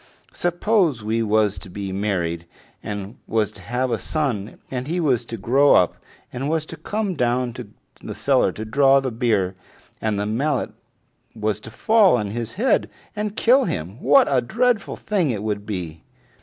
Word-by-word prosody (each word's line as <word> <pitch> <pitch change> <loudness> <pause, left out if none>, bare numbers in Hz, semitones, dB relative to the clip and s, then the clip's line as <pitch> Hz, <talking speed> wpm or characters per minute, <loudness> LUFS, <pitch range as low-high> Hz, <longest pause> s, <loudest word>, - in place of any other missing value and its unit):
Suppose 175 - +1
we 110 +2 0
was 105 -3 +2
to 95 - -11
be 100 +1 -5
married, 90 -4 -2 0.3
and 105 +1 -6
was 110 -2 0
to 95 - -13
have 125 +6 -2
a 115 - 0
son, 125 -10 -2
and 130 0 -3
he 170 +3 -1
was 135 -8 +2
to 115 - -6
grow 135 +8 +4
up, 90 - +4 0.4
and 130 +3 -3
was 160 -1 0
to - - -8
come 210 -2 -2
down 125 -3 0
to 125 -2 -8 0.4
the - - -6
cellar - - +2
to 110 - -6
draw 135 +4 +4
the 135 -2 -3
beer, 110 -5 +1 0.5
and 110 -2 0
the 105 - -1
mallet 130 +6 -1 0.6
was 105 -2 -1
to 115 - -10
fall 210 - +4
on 105 -1 -3
his 115 0 -4
head 250 +6 +1 0.3
and 210 0 -3
kill 255 +3 +4
him, 90 - -4
what 140 +2 +5
a 135 -3 +2
dreadful 235 - 0
thing 190 -8 0
it 105 -4 -2
would 105 -1 -3
be!" 85 -6 -5
120 Hz, 180 wpm, -22 LUFS, 105-150 Hz, 0.6 s, what